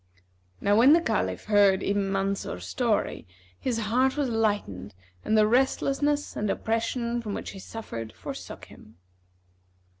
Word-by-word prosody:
Now 205 Hz, -, +2 dB
when 260 Hz, +6 st, +7 dB
the 335 Hz, -, +6 dB
Caliph 340 Hz, -, -1 dB
heard 200 Hz, -2 st, +4 dB
Ibn 200 Hz, -1 st, 0 dB
Mansur's 195 Hz, -, -2 dB
story 90 Hz, 0 st, -1 dB, 0.3 s
his 245 Hz, -3 st, -1 dB
heart 250 Hz, +5 st, +1 dB
was 285 Hz, -3 st, 0 dB
lightened 205 Hz, -, -1 dB, 0.3 s
and 220 Hz, -, +2 dB
the 215 Hz, -, +6 dB
restlessness 275 Hz, +4 st, +1 dB
and 210 Hz, -, -1 dB
oppression 235 Hz, +2 st, -1 dB
from 210 Hz, -3 st, -4 dB
which -, -, -5 dB
he 195 Hz, -, -10 dB
suffered 115 Hz, -, -7 dB
forsook -, -, -8 dB
him. 105 Hz, -, -17 dB
215 Hz, 140 wpm, -27 LUFS, 195-240 Hz, 0.3 s, when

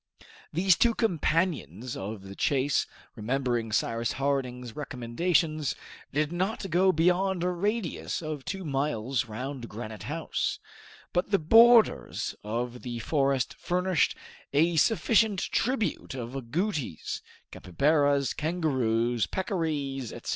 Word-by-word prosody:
These 175 Hz, +2 st, +3 dB
two 235 Hz, -1 st, +3 dB
companions 160 Hz, -, 0 dB
of 100 Hz, +1 st, -6 dB
the 95 Hz, 0 st, -9 dB
chase, 140 Hz, +6 st, +1 dB, 0.3 s
remembering 120 Hz, 0 st, -1 dB
Cyrus 115 Hz, +2 st, 0 dB
Harding's 125 Hz, -4 st, -2 dB
recommendations, 150 Hz, +4 st, 0 dB, 0.4 s
did 150 Hz, +2 st, 0 dB
not 190 Hz, +2 st, -2 dB
go 185 Hz, +3 st, +4 dB
beyond 180 Hz, +2 st, +2 dB
a 180 Hz, -, +1 dB
radius 205 Hz, +1 st, -2 dB
of 155 Hz, -3 st, -4 dB
two 190 Hz, +3 st, -5 dB
miles 135 Hz, -4 st, -1 dB
round 125 Hz, +2 st, -6 dB
Granite 110 Hz, -1 st, -7 dB
House; -, -, -2 dB, 0.6 s
but 180 Hz, +2 st, +1 dB
the 200 Hz, -, +4 dB
borders 225 Hz, +7 st, +5 dB
of 120 Hz, +3 st, -3 dB
the 120 Hz, -2 st, -5 dB
forest 135 Hz, 0 st, +1 dB
furnished 180 Hz, -2 st, +1 dB, 0.4 s
a 165 Hz, +4 st, +3 dB
sufficient 220 Hz, +3 st, +3 dB
tribute 225 Hz, -, -1 dB
of 125 Hz, 0 st, -6 dB
agoutis, 140 Hz, -, -3 dB, 0.3 s
capybaras, 140 Hz, -, +2 dB
kangaroos, 125 Hz, -8 st, 0 dB
peccaries, 150 Hz, -, -2 dB
etc. -, -, -8 dB
145 Hz, 110 wpm, -28 LUFS, 120-180 Hz, 0.6 s, borders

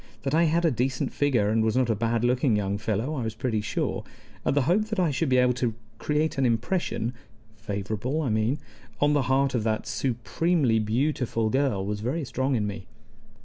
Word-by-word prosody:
That 135 Hz, -, -1 dB
I 165 Hz, +2 st, +4 dB
had 165 Hz, +2 st, +2 dB
a 165 Hz, -, +4 dB
decent 125 Hz, +1 st, -1 dB
figure, 125 Hz, -8 st, +2 dB
and 110 Hz, 0 st, +2 dB
was 110 Hz, +2 st, +1 dB
not 125 Hz, -3 st, +2 dB
a -, -, +1 dB
bad 115 Hz, +2 st, 0 dB
looking 125 Hz, -1 st, +2 dB
young 100 Hz, -1 st, -1 dB
fellow, 110 Hz, +6 st, -1 dB
I 140 Hz, -, -2 dB
was 110 Hz, -1 st, -3 dB
pretty 110 Hz, -2 st, -1 dB
sure; 105 Hz, -, -2 dB, 0.4 s
and -, -, +1 dB
the 145 Hz, -, +3 dB
hope 185 Hz, +10 st, +2 dB
that 215 Hz, -2 st, -3 dB
I 175 Hz, -4 st, +2 dB
should 140 Hz, +2 st, 0 dB
be 130 Hz, -, +4 dB
able 125 Hz, 0 st, +4 dB
to 120 Hz, -3 st, -1 dB, 0.2 s
create 150 Hz, -1 st, 0 dB
an -, -, +2 dB
impression 120 Hz, -, -1 dB, 0.4 s
(favorable, 110 Hz, +7 st, -3 dB
I 135 Hz, -, -1 dB
mean) 110 Hz, +6 st, +1 dB, 0.4 s
on 145 Hz, 0 st, +3 dB
the 145 Hz, -, +3 dB
heart 135 Hz, 0 st, +2 dB
of 120 Hz, -, +1 dB
that 110 Hz, -1 st, 0 dB
supremely 120 Hz, -, +1 dB
beautiful 115 Hz, 0 st, 0 dB
girl 130 Hz, -8 st, +1 dB
was 105 Hz, +1 st, -2 dB
very 135 Hz, +8 st, -2 dB
strong 130 Hz, +2 st, -1 dB
in 105 Hz, -3 st, 0 dB
me. 100 Hz, -1 st, -6 dB
125 Hz, 205 wpm, -26 LUFS, 110-140 Hz, 0.4 s, I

